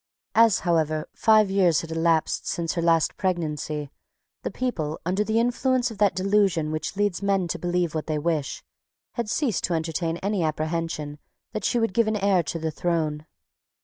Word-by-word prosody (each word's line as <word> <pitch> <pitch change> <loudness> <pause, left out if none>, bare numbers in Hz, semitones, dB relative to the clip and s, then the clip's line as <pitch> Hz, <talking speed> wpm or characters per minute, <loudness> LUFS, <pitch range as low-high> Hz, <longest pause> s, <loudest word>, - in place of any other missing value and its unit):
As, 225 -2 +5
however, 155 -3 0
five 215 -2 +4
years 185 -5 +3
had 165 - -8
elapsed 165 0 +1
since 165 -1 -1
her 170 - -1
last 165 -2 +2
pregnancy, 155 -5 -2 0.5
the - - -3
people, 160 -12 -3
under 190 +4 +1
the 220 +1 +1
influence 245 +1 +1
of 210 - -10
that 205 -2 +3
delusion 190 -5 +2
which 155 +5 -3
leads 205 -3 0
men 195 -2 +1
to 175 - -3
believe 175 -1 0
what 155 -1 -3
they 155 -1 0
wish, 150 -2 -2 0.5
had 235 -3 -3
ceased 240 - 0
to 170 - -1
entertain 165 +1 -2
any 200 +1 -1
apprehension 155 -1 -2 0.3
that 215 - -3
she - - +1
would 225 -4 +1
give 230 +2 +3
an 215 - +1
heir 195 -2 +3
to 165 - -4
the 160 -1 -2
throne. 155 -2 -1
175 Hz, 180 wpm, -25 LUFS, 160-205 Hz, 0.5 s, As